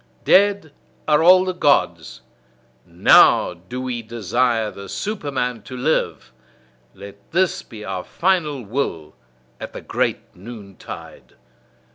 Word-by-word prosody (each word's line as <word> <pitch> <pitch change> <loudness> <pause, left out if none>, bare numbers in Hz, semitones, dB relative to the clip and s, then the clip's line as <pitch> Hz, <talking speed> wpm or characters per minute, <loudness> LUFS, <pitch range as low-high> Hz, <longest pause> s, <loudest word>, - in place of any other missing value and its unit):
"DEAD 200 -5 +3 0.4
ARE 150 0 +4
ALL 185 +2 +6
THE 185 - -2
GODS: 150 -5 0 0.7
NOW 85 +1 +5
DO 90 +9 -9
WE 125 -2 -4
DESIRE 115 0 -1
THE 100 -1 -10
SUPERMAN 135 - -3
TO 130 +5 -9
LIVE." 155 +6 -1 0.6
Let 100 0 -11
this 185 +2 +1
be 110 -4 -11
our 95 -1 -4
final 155 - -1
will 100 - -3 0.5
at - - -8
the - - -8
great - - -1
noontide! 100 -1 -11
125 Hz, 115 wpm, -21 LUFS, 100-160 Hz, 0.7 s, ALL